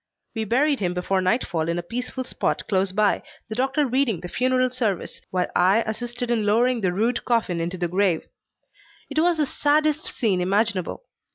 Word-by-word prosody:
We 225 -1 -2
buried 275 +6 +2
him 180 -3 -1
before 185 +1 0
nightfall 180 -5 0
in 170 - 0
a 175 - -3
peaceful 250 +7 -4
spot - - -2
close 190 -1 +1
by, 210 +1 +2 0.3
the - - -3
doctor 270 +5 +1
reading 250 -8 +1
the 180 - -7
funeral 255 +2 +1
service, 220 -7 -2
while 180 -1 0
I 195 +6 +4
assisted 240 +2 -4
in 230 -3 +1
lowering 235 +4 +2
the 185 -3 +1
rude 225 +7 0
coffin 220 -8 0
into 175 +2 -3
the 175 -1 -1
grave. 180 -2 +1 0.9
It 295 - 0
was 340 +1 +3
the 305 - +2
saddest 300 +2 +1
scene 195 -6 0
imaginable. 200 - 0
220 Hz, 180 wpm, -24 LUFS, 185-255 Hz, 0.9 s, I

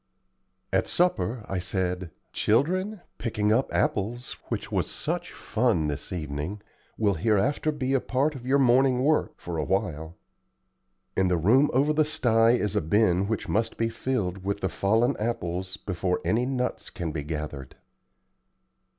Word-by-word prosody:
At - - +2
supper 120 - 0
I 95 - -2
said: 90 -1 -2 0.2
"Children, 185 - +1 0.2
picking 105 -2 +1
up 130 +4 +1
apples, 115 +5 -1
which - - -4
was - - 0
such - - -3
fun 110 -10 0
this 75 0 -4
evening, 80 +4 -4 0.3
will 105 -2 +2
hereafter 115 - +1
be 135 -2 0
part 135 +5 0
of 130 -4 -9
your 130 +3 +3
morning 130 0 +4
work, 155 +2 +1
for 85 -2 -4
a - - 0
while. 80 -3 -2 1.0
In 95 - +3
the 90 -1 +2
room 125 - +4
over 140 +4 +3
the 155 +1 +4
sty 120 -7 +3
is 105 -6 0
a - - +2
bin 95 +2 +2
which 110 0 -2
must 110 +2 0
be 115 0 +1
filled 105 -6 -2
with 100 +1 -2
the 95 - 0
fallen 115 +7 +2
apples 95 -4 -2
before 90 -2 -2
any 120 +3 +2
nuts 125 -2 -2
can 85 -3 -4
be 75 -1 -3
gathered." 75 -3 -5
105 Hz, 150 wpm, -27 LUFS, 90-130 Hz, 1.0 s, morning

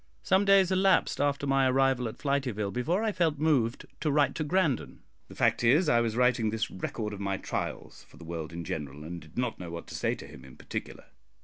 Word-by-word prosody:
Some 190 +2 +3
days 195 -2 +5
elapsed 190 -4 +3
after 145 0 0
my 135 -1 +3
arrival 130 -2 +2
at 110 - -7
Flityville 130 -8 -1
before 170 - 0
I 220 - +1
felt 165 -6 +1
moved 140 -7 +1
to 155 - 0
write 145 -1 +3
to 155 - -2
Grandon. 160 - 0 0.3
The - - -13
fact - - +2
is, 145 +9 +4
I 120 -5 +4
was 115 -2 -1
writing 125 -2 +2
this 110 +1 -2
record 105 +3 -4
of 100 - -7
my 100 -1 -1
trials - - -5
for - - -18
the 85 - -12
world 80 -2 -5
in 85 0 -6
general, 75 -2 -5
and 85 +2 -7
did 80 +5 -16
not 125 - -1
know 90 -2 -6
what 85 0 -7
to - - -8
say - - 0
to - - -10
him 70 -3 -13
in 65 -1 -14
particular. - - -6
125 Hz, 225 wpm, -29 LUFS, 100-150 Hz, 0.3 s, days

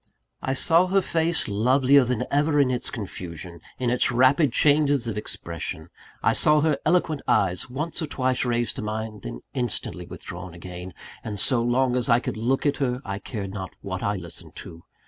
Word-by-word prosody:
I 130 - -1
saw 165 +6 +4
her 195 +1 +3
face, 165 0 0
lovelier 130 +6 +4
than 125 -2 -1
ever 145 +1 +3
in 135 -3 +4
its 125 - 0
confusion, 90 -5 -7 0.2
in 125 -2 0
its 125 - +2
rapid 130 +4 +4
changes 145 -1 +3
of 115 - -2
expression; 85 -4 -5 0.3
I - - +4
saw 150 0 +4
her 150 -2 +2
eloquent 160 -3 +2
eyes 90 +1 +1
once 155 +7 -3
or 160 - -2
twice 130 -3 0
raised 120 -1 0
to - - -3
mine, 110 0 -4
then - - -7
instantly 120 -4 -3
withdrawn 90 0 -8
again 90 +1 -8 0.3
and 105 -1 -4
so 120 +4 +2
long 125 +1 +2
as 125 -1 0
I 120 0 +6
could - - -4
look 120 +6 0
at 145 -1 +2
her, 125 -1 -1
I 100 0 -4
cared 100 -4 -5
not 95 -3 -6
what 95 -2 -4
I 100 0 0
listened 85 -3 -9
to. 85 0 -10
120 Hz, 185 wpm, -25 LUFS, 100-140 Hz, 0.3 s, I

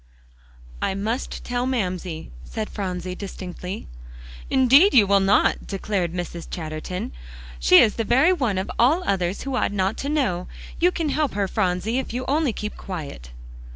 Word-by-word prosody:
"I 190 - 0
must 220 +6 -3
tell 245 +1 -1
Mamsie," 185 - -3
said 215 - -5
Phronsie 185 -2 -4
distinctly. 185 -1 -7 0.6
"Indeed 270 +9 +6
you 220 -5 +8
will 200 0 +4
not," 195 +1 +2
declared 195 -3 -2
Mrs. 175 -1 -5
Chatterton. 160 +2 -5 0.5
"She - - +6
is 215 - +5
the 225 - +1
very 265 +11 +4
one 245 - 0
of 190 - -2
all 295 +10 +4
others 190 - -1
who 275 -1 -3
ought - - +1
not 195 +1 0
to 280 - -3
know. 210 - 0 0.3
You 355 +2 +4
can 330 -4 -2
help 295 -5 0
her, 200 -1 +1
Phronsie, 190 +4 0
if 265 - -5
you 255 +1 -3
only 295 -1 +2
keep 210 -1 -5
quiet." 145 - -7
200 Hz, 160 wpm, -23 LUFS, 180-255 Hz, 0.6 s, you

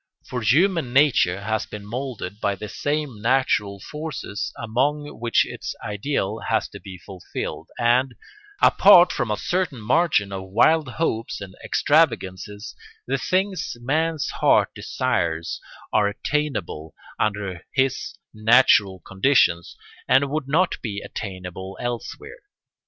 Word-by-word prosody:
For 125 - -4
human 155 - +2
nature 130 -10 +3
has 110 +1 -2
been 105 -1 -8
moulded 115 -4 -5
by 100 -1 0
the 105 - -7
same 145 -1 -3
natural 115 -5 +1
forces 150 -5 -5
among 140 +5 -1
which 115 0 +2
its - - -6
ideal 105 0 -2
has - - 0
to - - -10
be 95 -2 -10
fulfilled, 90 0 -7
and, 125 +2 +2 0.5
apart 185 -3 +7
from 125 - -2
a 105 - 0
certain 175 - -1
margin 120 - +2
of 95 -1 -6
wild 150 +9 +3
hopes 115 -9 -2
and 95 -2 -9
extravagances, 105 - 0 0.3
the - - -1
things 185 -7 -1
man's 155 +4 0
heart - - +3
desires 80 -1 -2 0.3
are 105 -2 +4
attainable 100 - -3 0.2
under 100 -4 -2
his 135 -1 0 0.2
natural 110 -4 +4
conditions 95 -5 +2 0.3
and 135 +1 +3
would 150 -2 -2
not 170 +6 +1
be 100 -3 -4
attainable 95 -1 -7
elsewhere. 120 - -5
115 Hz, 125 wpm, -23 LUFS, 100-145 Hz, 0.5 s, apart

